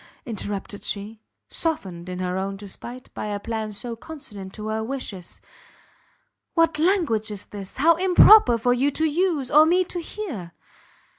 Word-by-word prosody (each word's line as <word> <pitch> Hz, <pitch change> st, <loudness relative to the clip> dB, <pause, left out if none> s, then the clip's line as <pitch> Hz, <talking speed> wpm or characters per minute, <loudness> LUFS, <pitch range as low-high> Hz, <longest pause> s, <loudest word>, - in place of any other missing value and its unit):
interrupted 205 Hz, -3 st, -5 dB
she, 210 Hz, +2 st, -5 dB, 0.3 s
softened 190 Hz, -, -3 dB
in 180 Hz, -, -4 dB
her 180 Hz, 0 st, -2 dB
own 195 Hz, +1 st, -3 dB
despite 235 Hz, +5 st, -9 dB
by -, -, -4 dB
a 205 Hz, -1 st, -3 dB
plan 220 Hz, 0 st, -4 dB
so 230 Hz, +3 st, -6 dB
consonant 215 Hz, -9 st, -9 dB
to 215 Hz, +2 st, -7 dB
her 220 Hz, 0 st, -1 dB
wishes, 220 Hz, -8 st, -6 dB, 1.2 s
"what 330 Hz, -2 st, +3 dB
language 315 Hz, -, +2 dB
is 205 Hz, -2 st, -7 dB
this! 200 Hz, -2 st, -9 dB
how 320 Hz, +5 st, +6 dB
improper 365 Hz, -, +7 dB
for 245 Hz, +2 st, +2 dB
you 265 Hz, +3 st, +2 dB
to 315 Hz, +3 st, -1 dB
use, 315 Hz, -4 st, 0 dB
or 300 Hz, +1 st, +8 dB
me 355 Hz, +4 st, +3 dB
to 355 Hz, 0 st, -5 dB
hear!" 285 Hz, -, -6 dB
230 Hz, 155 wpm, -24 LUFS, 205-315 Hz, 1.2 s, or